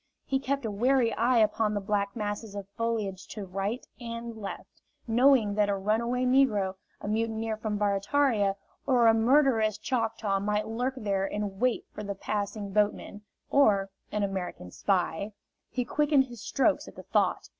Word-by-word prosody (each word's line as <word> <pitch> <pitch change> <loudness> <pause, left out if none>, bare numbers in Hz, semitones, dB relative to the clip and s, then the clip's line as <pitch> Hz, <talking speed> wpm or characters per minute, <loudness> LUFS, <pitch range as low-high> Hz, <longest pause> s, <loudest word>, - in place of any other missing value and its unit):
He 270 - 0
kept 275 -1 -2
a 220 - -1
wary 240 +2 +2
eye 240 +3 +2
upon 215 -1 +2
the - - +1
black 200 0 -1
masses 210 -1 -4
of 200 -1 -6
foliage 210 -3 -3
to 210 -3 -5
right 195 +6 -3
and 230 -1 -6
left, 205 -3 -8 0.3
knowing 240 -2 +4
that 205 0 +2
a 200 - +2
runaway 230 +5 0
negro, 245 -8 +3 0.3
a - - -7
mutineer 225 +1 -1
from 215 -1 -3
Barataria, 205 +1 +2 0.3
or 250 -3 +4
a 225 - +7
murderous 225 -2 +3
Choctaw 225 -5 -1
might 210 +1 -1
lurk 245 +4 -2
there 200 -4 0
in 205 -2 -4
wait 250 0 +1
for - - -6
the 200 -1 -4
passing 205 0 -3
boatman; 210 0 0 0.3
or 200 -8 +4 0.2
an 210 -1 0
American 185 - -4
spy, 195 - -1 0.4
he 250 -1 -2
quickened 295 -1 +3
his 240 -4 -11
strokes 285 +6 +1
at - - -12
the - - -10
thought! - - 0
215 Hz, 165 wpm, -28 LUFS, 200-240 Hz, 0.4 s, a